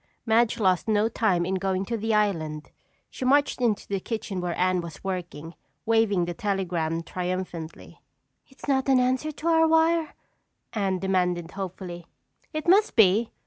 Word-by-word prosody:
Madge 230 +1 +2
lost 185 -3 +2
no 215 0 +3
time 200 -6 +1
in 185 - -2
going 190 0 -1
to 230 - -3
the 225 0 -2
island. 165 -8 -1 0.4
She - - -7
marched 280 0 +2
into 225 -4 0
the 200 -1 -2
kitchen 200 -3 -4
where 175 -1 -3
Anne 185 0 +2
was 170 -2 -10
working, 175 -4 -5 0.3
waving 225 -5 +2
the 175 - -4
telegram 170 -4 -2
triumphantly. 180 -2 -5 0.5
"It's 265 - -13
not 270 -1 +1
an 265 -1 +5
answer 260 +4 0
to 305 +2 -6
our 325 -1 +4
wire?" 325 0 +2 0.6
Anne 195 -4 0
demanded 180 -2 0
hopefully. 180 -3 -7 0.4
"It 310 +1 -4
must 405 +5 +4
be. 220 +1 +4
195 Hz, 155 wpm, -26 LUFS, 180-235 Hz, 0.6 s, an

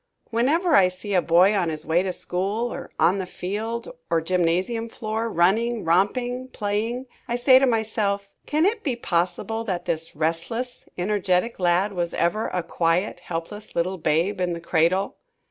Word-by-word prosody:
Whenever 305 +9 +2
I 185 - +7
see 185 +3 -5
a 180 - +4
boy 175 +5 +5
on 180 -4 +1
his 155 -1 -5
way 165 +2 +3
to 190 0 -1
school, 200 +7 -2
or - - -7
on 190 +3 +4
the 185 - -3
field 220 +6 -4 0.2
or 165 - +3
gymnasium 185 +7 0
floor, 225 0 -3
running, 220 +5 +2
romping, 245 +9 +1
playing, 225 +3 -2 0.2
I 240 - -1
say 255 +1 +6
to 270 - +3
myself, 210 -3 0 0.2
"Can 305 +3 +2
it 425 +2 +1
be 265 -5 -1
possible 220 +2 -1
that 180 -4 -3
this 160 0 -2
restless, 170 +11 -3
energetic 195 +2 0
lad 180 +3 +2
was 175 -2 -2
ever 175 +6 +1
a 180 -1 -2
quiet, 170 +3 0
helpless 180 +5 -6
little 185 +2 -1
babe 170 +6 +1
in 175 -1 0
the 170 - -4
cradle!" 170 +3 +1
195 Hz, 165 wpm, -24 LUFS, 175-230 Hz, 0.2 s, I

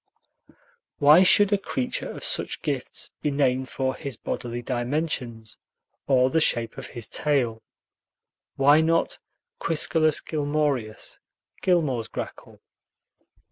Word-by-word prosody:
Why 150 +4 +7
should 205 +2 +5
a 200 - +2
creature 130 -9 -3
of - - -8
such - - -1
gifts - - -3
be 150 - 0
named 130 -2 0
for 130 -1 -1
his 135 -3 -6
bodily 120 0 -5
dimensions, 120 -3 -3 0.5
or 130 -1 +3
the 160 - +3
shape 115 -7 0
of 130 - -7
his 120 -3 -6
tail? 125 -7 0 0.9
Why 145 +3 +5
not 165 +1 +1 0.4
Quiscalus 155 -1 +2
gilmorius, 145 -7 -2 0.4
Gilmore's 145 -11 +1
grackle? - - -8
140 Hz, 110 wpm, -25 LUFS, 120-155 Hz, 0.9 s, Why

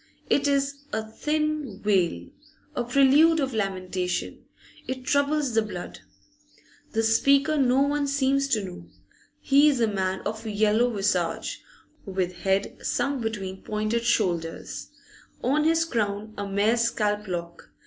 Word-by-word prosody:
It 285 0 +3
is 280 0 0
a 220 0 -3
thin 300 -2 -2
wail, 180 - +1 0.5
a 245 - 0
prelude 275 +6 +5
of 270 -3 -1
lamentation; 185 -3 -2 0.4
it 260 0 -4
troubles 285 -1 +1
the 225 - +4
blood. 210 -5 -7 0.9
The 225 -1 +1
speaker 275 +7 +3
no 265 -2 +3
one 285 0 0
seems 275 0 +1
to 220 -6 +1
know; 180 -2 -9 0.5
he 285 +2 +5
is 275 -4 0
a 230 - +4
man 190 -2 -1
of 220 +2 -5
yellow 215 +3 +2
visage, 195 -6 -1 0.4
with 185 -2 -3
head 195 +1 0
sunk 280 -2 -1
between 195 -4 -4
pointed 215 +2 -1
shoulders, 175 -9 -1 0.6
on 300 +4 +2
his 330 +1 +3
crown 215 -6 -2
a 200 -1 -4
mere 205 +4 +2
scalp 210 -3 0
lock. 170 -2 -6
225 Hz, 135 wpm, -26 LUFS, 195-275 Hz, 0.9 s, prelude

